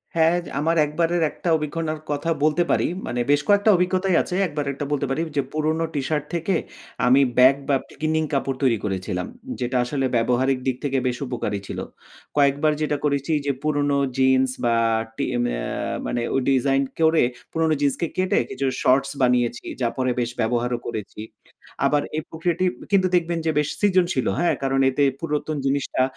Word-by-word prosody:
হ্যাঁ, 165 +1 +4 0.2
আমার 165 +3 +1
একবারের 165 +3 0
একটা 175 - -4
অভিজ্ঞতার 155 +1 -3
কথা 145 +3 -2
বলতে 155 +3 +3
পারি। - - +2 0.2
মানে 120 - -2
বেশ 145 - +4
কয়েকটা 205 +1 +4
অভিজ্ঞতাই 185 +1 +1
আছে। 180 - -4
একবার 150 -2 -3
একটা 140 +1 -5
বলতে 145 -1 0
পারি 135 +4 -1 0.2
যে - - +4
পুরনো 155 +1 0
টিশার্ট 150 +1 -1
থেকে 170 +3 0 0.5
আমি 130 +3 +6 0.2
ব্যাগ 130 +2 +7
বা, 140 - +4 0.2
ক্লিনিং 155 0 +1
কাপড় 135 -1 -1
তৈরি 120 -4 +3
করেছিলাম। 95 -2 -3 0.3
যেটা 125 +1 -1
আসলে 135 +2 -1
ব্যবহারিক 125 +3 +2
দিক 130 - +1
থেকে 135 -1 0
বেশ 125 0 -1
উপকারী 105 -5 -3
ছিল। - - -5 0.6
কয়েকবার 145 +2 +3
যেটা 150 -1 0
করেছি 140 +1 0
যে 140 - +2
পুরনো 145 -2 +1 0.2
জিন্স 130 0 +4 0.2
বা, 120 -1 +3 0.4
টি - - 0 0.2
মা - - -1 0.5
মানে 120 - -1
অ - - +3
ডিজাইন 135 +1 +2 0.2
করে 160 0 +4 0.3
পুরনো 160 -1 +1
জিন্সকে 145 +4 +1
কেটে 185 0 +2
কিছু 135 - -3 0.2
শর্টস 135 +2 +3
বানিয়েছি। 125 -1 +1 0.2
যা 120 - +2
পরে 130 -1 +1
বেশ 120 - 0
ব্যবহারও 120 +1 0
করেছি। 105 0 -6 0.6
আবার 145 0 +3 0.2
এই - - 0
প্রক্রিয়াটি 170 +2 -1 0.3
কিন্তু 190 -2 +4
দেখবেন 170 -1 +1
যে 160 - +2
বেশ 150 - 0
সৃজনশীলও, 180 - +2
হ্যাঁ? 175 0 +2
কারণ 135 0 +1
এতে 135 +2 +1 0.2
পুরাতন 150 -1 -2
জিনিসটা 135 -1 0
145 Hz, 165 wpm, -23 LUFS, 130-160 Hz, 0.6 s, ব্যাগ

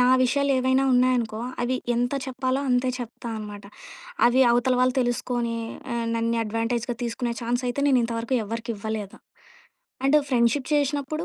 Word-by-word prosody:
నా 250 - +5 0.2
విషయాలేవైనా 260 0 +2
ఉన్నాయనుకో, 245 -3 +2 0.2
అవి 255 +1 0 0.2
ఎంత 245 +3 0
చెప్పాలో, 260 +1 -1
అంతే 250 +1 +2
చెప్తా 240 0 -7
అనమాట. 205 -1 -8 0.6
అవి 245 +2 +4
అవతల 245 +2 +2
వాళ్ళు 255 0 +3
తెలుసుకొనీ 240 -1 -1 0.4
ఆహ్, 235 -1 -1
నన్నే 230 0 0
అడ్వాంటేజ్‌గా 230 +2 -2
తీసుకునే 235 +1 -2
ఛాన్సయితే, 245 +3 -1
నేనింతవరకు 235 -1 +1
ఎవ్వరికివ్వలేదు. 220 -2 -5 0.9
And, 280 +3 +5
friendship 250 +2 +2
చేషినప్పుడు, 290 +1 0
245 Hz, 125 wpm, -25 LUFS, 230-260 Hz, 0.9 s, నా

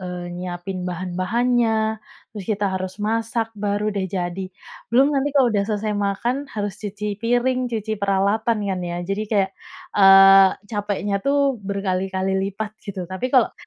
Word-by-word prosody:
eee, 180 -1 -6
nyiapin 180 +1 -5
bahan-bahannya, 220 +5 0 0.3
terus 205 -4 -7
kita 205 -2 0
harus 185 0 -4
masak, 225 +1 -1
baru, 205 0 -1
deh, 190 -2 -2
jadi. 185 0 -3 0.4
Belum 270 +5 +4
nanti 280 +1 +1
kalau 250 -4 +4
udah 200 -1 +1
selesai 210 0 -1
makan 235 +7 -1
harus 205 -5 -3
cuci 210 0 -5
piring, 245 +2 +1
cuci 220 -2 -3
peralatan, 200 +3 +1
kan, 190 -2 -2
ya, 175 -1 -4
jadi 195 +3 -2
kayak, 195 -3 +1 0.4
eee, 195 -1 +8 0.2
capeknya, 205 -1 -2
tuh, 275 -3 +1
berkali-kali 190 -1 -2 0.2
lipat 215 +2 -5
gitu. 190 -3 -6
Tapi 185 +7 -4
kalau 255 -2 +3
205 Hz, 145 wpm, -22 LUFS, 190-225 Hz, 0.4 s, eee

